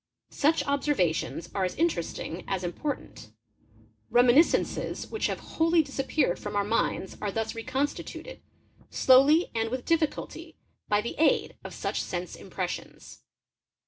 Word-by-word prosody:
Such 310 +3 +2
observations 260 - 0
are 195 - 0
as 180 - -1
inter 330 - +1
esting 165 +1 -6
as 190 -2 -2
important. 175 - -5 0.8
Reminiscences 245 +6 +3
which 440 - 0
have - - -3
wholly 330 0 +2
disappeared 275 - 0
from 205 0 -5
our 205 - +2
minds 205 -2 -1
are 205 - -1
thus 225 +2 -2
reconstituted, 265 - -4 0.5
slowly 275 +6 +5
and 225 -1 0
with 255 +1 -4
difficulty, 330 -2 -1 0.3
by 205 0 +3
the 235 - -4
aid 320 - +3
of - - -8
such - - -2
sense - - -4
impressions. - - -6
255 Hz, 130 wpm, -28 LUFS, 205-300 Hz, 0.8 s, slowly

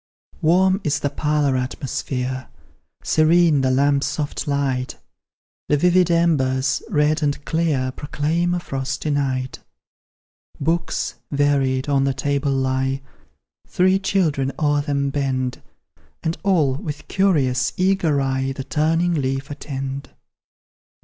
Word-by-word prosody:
Warm 185 +4 +3
is 145 -1 0
the 145 - -1
parlour 150 -2 +1
atmosphere, 130 0 -3 0.6
Serene 160 -2 +4
the 130 - +2
lamp's 140 +2 +2
soft 150 +1 -3
light; 135 -3 -1 0.7
The 150 - +4
vivid 180 +2 +3
embers, 140 -6 +2
red 155 -3 +2
and 145 -1 -1
clear, 155 -6 0
Proclaim 160 +6 -1
a - - -1
frosty 135 -1 -3
night. 130 -2 -1 1.0
Books, 165 +2 -1
varied, 140 -2 +1
on 140 -1 +2
the 135 -1 0
table 140 +1 0
lie, 135 0 0 0.6
Three 185 +1 +3
children 160 -9 0
o'er 145 -1 +2
them 140 -1 -1
bend, 130 -3 -2 0.6
And 165 0 -1
all, 165 -9 +2
with 150 0 -6
curious, 135 -10 +2
eager 185 -6 +2
eye, 135 0 -1
The 135 - -6
turning 165 +4 +1
leaf 135 -1 -2
attend. 135 -1 -5
145 Hz, 115 wpm, -21 LUFS, 135-160 Hz, 1.0 s, Serene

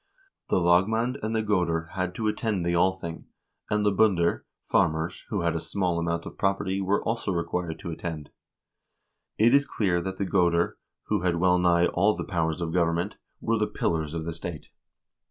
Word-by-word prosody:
The - - +3
lagmand 110 +9 +2
and 110 +1 -2
the 110 - +1
goder 85 -5 0
had 90 -1 -3
to 110 - -1
attend 105 -4 -1
the 85 - +1
Althing, 85 -2 0 0.4
and 105 0 +1
the 105 - +4
binder 95 -4 +2 0.2
(farmers) 80 +2 0
who 100 -4 -1
had 85 -1 0
a - - 0
small 85 +1 -1
amount 85 0 -2
of - - -9
property 95 0 0
were 100 +2 +1
also 115 -3 -1
required 85 -1 -2
to 85 - -6
attend. 80 -3 -6 1.1
It 115 +4 +5
is 140 0 +4
clear 90 -5 0
that 95 +1 -5
the 100 - -1
goder, 85 -2 +2 0.2
who 105 -3 -1
had 90 -1 +1
well 90 +1 +3
nigh 85 -1 +4
all 100 +5 +2
the - - -4
powers 85 -3 -1
of 80 -1 -2
government, 85 +2 0 0.2
were 115 -1 +1
the 105 - +1
pillars 80 -2 -1
of 80 -1 -3
the 85 - -3
state. 80 -1 -7
90 Hz, 185 wpm, -27 LUFS, 85-100 Hz, 1.1 s, It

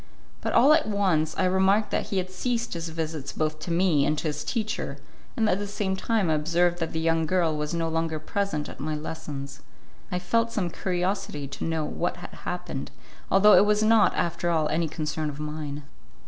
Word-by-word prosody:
But - - -2
all 280 +5 +7
at 315 -6 +3
once 180 -7 +1
I 190 - +2
remarked 190 +3 +3
that - - -1
he 195 - -2
had 185 0 -2
ceased 235 +4 -2
his 165 -1 -4
visits 160 -3 -4
both 155 0 -1
to 175 - -6
me 170 -4 +3
and 150 +2 +1
to 155 - -1
his 150 - -4
teacher, 220 -3 -2 0.4
and 225 -2 +3
at 195 - +2
the 205 - -3
same 200 -2 -1
time 215 -1 0
I 160 - +2
observed 170 +3 +2
that 165 -1 -2
the 160 - -2
young 165 0 +1
girl 170 -3 +2
was 150 +2 -2
no 165 -1 0
longer 165 0 -1
present 155 -1 -2
at - - -10
my 155 +1 -2
lessons; 145 -3 -6 0.5
I 180 - 0
felt 230 +6 +1
some 185 -6 -1
curiosity 180 -6 -2
to - - -5
know 160 -2 -1
what 175 +3 -2
had 175 - -9
happened, 180 -6 -5 0.4
although 205 +2 +6
it 205 - +7
was 210 0 +3
not, 220 -1 +5
after 170 0 0
all, 160 -2 +2
any 165 +1 +1
concern 155 -1 -3
of 145 0 -7
mine. 150 -1 -5
170 Hz, 205 wpm, -26 LUFS, 155-195 Hz, 0.5 s, all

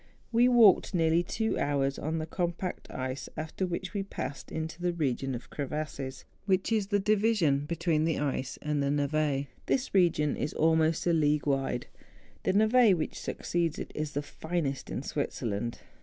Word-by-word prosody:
We 240 +1 +5
walked 225 -7 +6
nearly 165 0 +3
two 220 +5 -1
hours 140 -1 0
on 160 +2 -2
the 155 - -2
compact 175 +2 -3
ice, 130 +1 -4
after 155 +4 -3
which 180 +1 -4
we 200 - -1
passed 145 -8 -6
into 160 +1 -4
the 175 0 +1
region 135 -4 -1
of 120 - -9
crevasses, 140 -2 -4 0.2
which 190 +2 +2
is 215 -3 +1
the 205 0 +2
division 200 -9 +2
between 165 -1 +1
the 160 - +1
ice 135 -3 -2
and 150 -1 0
the 140 - +1
nevL 145 -1 +1 0.2
This 265 -1 0
region 165 -6 +3
is 150 - -3
almost 160 0 +3
a 175 - +3
league 150 -3 +2
wide. 135 -3 0 0.6
The - - +2
neve^ 220 0 +5
which 160 - -3
succeeds 170 -2 -1
to - - -3
it, - - -15
is 150 -1 -3
the 145 - -1
finest 155 -2 -3
in - - -3
Switzerland. 115 +1 -3
160 Hz, 170 wpm, -29 LUFS, 145-180 Hz, 0.6 s, walked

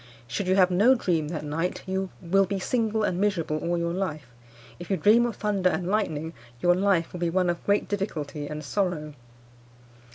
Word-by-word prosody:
Should 125 +11 -3
you 185 - +3
have 185 -1 +4
no 215 +9 +5
dream 170 -9 0
that 155 -1 -5
night, 165 +4 -2
you 190 0 -2
will 195 +3 +3
be 200 +1 -2
single 220 +2 0
and 185 -2 0
miserable 170 -7 0
all 175 +2 -1
your 170 0 -1
life. 175 -6 -3 0.5
If 175 - -9
you 195 - +1
dream 225 +8 +5
of 235 - -5
thunder 200 -3 +1
and 180 0 -2
lightning, 165 -6 -1 0.3
your 175 +5 +4
life 185 -2 +1
will 180 - -6
be 170 -1 0
one 180 0 +2
of 170 - -7
great 205 0 +2
difficulty 155 -8 -3
and 150 +1 -6
sorrow. 155 -2 -2
180 Hz, 195 wpm, -26 LUFS, 165-200 Hz, 0.5 s, no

